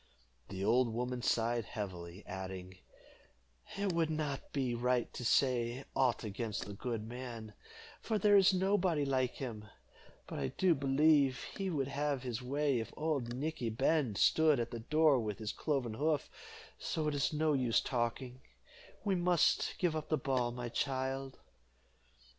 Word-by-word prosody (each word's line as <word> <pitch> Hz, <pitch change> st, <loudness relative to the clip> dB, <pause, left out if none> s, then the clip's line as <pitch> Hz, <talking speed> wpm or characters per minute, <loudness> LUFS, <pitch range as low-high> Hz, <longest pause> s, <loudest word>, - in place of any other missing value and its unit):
The 95 Hz, 0 st, -3 dB
old 120 Hz, +2 st, +3 dB
woman 125 Hz, +2 st, -2 dB
sighed 115 Hz, -1 st, +1 dB
heavily, 95 Hz, -3 st, -6 dB
adding, 95 Hz, -1 st, -7 dB, 1.0 s
"It 200 Hz, -2 st, 0 dB
would 165 Hz, -1 st, +1 dB
not 150 Hz, -3 st, -3 dB
be 130 Hz, -4 st, -1 dB
right 125 Hz, +1 st, 0 dB
to -, -, -6 dB
say 125 Hz, +1 st, +2 dB
aught 125 Hz, -3 st, +2 dB
against 105 Hz, 0 st, -3 dB
the 100 Hz, -, -7 dB
good 110 Hz, +1 st, -4 dB
man, 115 Hz, -3 st, -7 dB, 0.5 s
for 220 Hz, -, 0 dB
there 205 Hz, 0 st, +5 dB
is 195 Hz, -1 st, +7 dB
nobody 185 Hz, -5 st, +2 dB
like 130 Hz, -2 st, +1 dB
him; 115 Hz, -5 st, -6 dB, 0.6 s
but -, -, -6 dB
I 70 Hz, -, 0 dB
do 180 Hz, -, +2 dB
believe 140 Hz, -1 st, +3 dB
he 195 Hz, -1 st, -2 dB
would 140 Hz, -6 st, -1 dB
have 140 Hz, -1 st, -1 dB
his 125 Hz, -1 st, -3 dB
way 140 Hz, 0 st, 0 dB
if 110 Hz, -, -5 dB
old 140 Hz, -7 st, -1 dB
Nickey 140 Hz, -3 st, -2 dB
Bend 130 Hz, -1 st, +1 dB
stood 155 Hz, -4 st, +4 dB
at 120 Hz, 0 st, -2 dB
the 120 Hz, -, -4 dB
door 150 Hz, +3 st, +3 dB
with 105 Hz, -4 st, -3 dB
his 110 Hz, -1 st, -3 dB
cloven 135 Hz, -7 st, -1 dB
hoof, 150 Hz, +3 st, 0 dB, 0.5 s
so 155 Hz, -1 st, -2 dB
it 150 Hz, -, 0 dB
is 140 Hz, -2 st, +1 dB
no 155 Hz, 0 st, +1 dB
use 125 Hz, -4 st, +2 dB
talking 125 Hz, +1 st, -2 dB, 0.6 s
we 200 Hz, -2 st, +1 dB
must 175 Hz, -1 st, +2 dB
give 175 Hz, -4 st, +1 dB
up 155 Hz, -1 st, -4 dB
the 155 Hz, -, +2 dB
ball, 130 Hz, -3 st, 0 dB
my 120 Hz, 0 st, -5 dB
child." 135 Hz, +1 st, -2 dB
130 Hz, 160 wpm, -34 LUFS, 115-150 Hz, 1.0 s, is